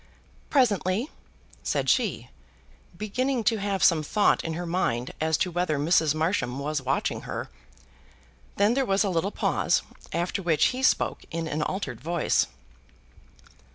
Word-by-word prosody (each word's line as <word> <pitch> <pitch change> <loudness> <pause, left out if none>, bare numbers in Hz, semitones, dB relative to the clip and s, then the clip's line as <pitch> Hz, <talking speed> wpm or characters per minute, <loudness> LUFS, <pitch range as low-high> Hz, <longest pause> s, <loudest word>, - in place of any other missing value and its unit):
"Presently," 220 - +2 0.5
said - - -1
she, - - +1 0.7
beginning 250 +5 -1
to 225 +1 +2
have 195 -2 -1
some 165 -3 +5
thought 205 +7 +2
in 165 - -3
her 175 +1 -4
mind 130 -9 -1
as 160 -1 +2
to 180 - 0
whether 175 -3 0
Mrs. 155 0 +3
Marsham 155 -6 0
was 145 +1 -2
watching 135 +1 -1
her. - - -6 1.0
Then 205 +3 +3
there 270 +2 +2
was 195 -4 +2
a 200 - 0
little 175 +3 0
pause, - - +1 0.3
after 175 +3 -1
which 165 -4 +3
he 255 - -4
spoke 265 - +1
in 165 0 -3
an 155 0 -2
altered 190 +6 -3
voice. 170 0 +1
175 Hz, 145 wpm, -26 LUFS, 155-205 Hz, 1.0 s, some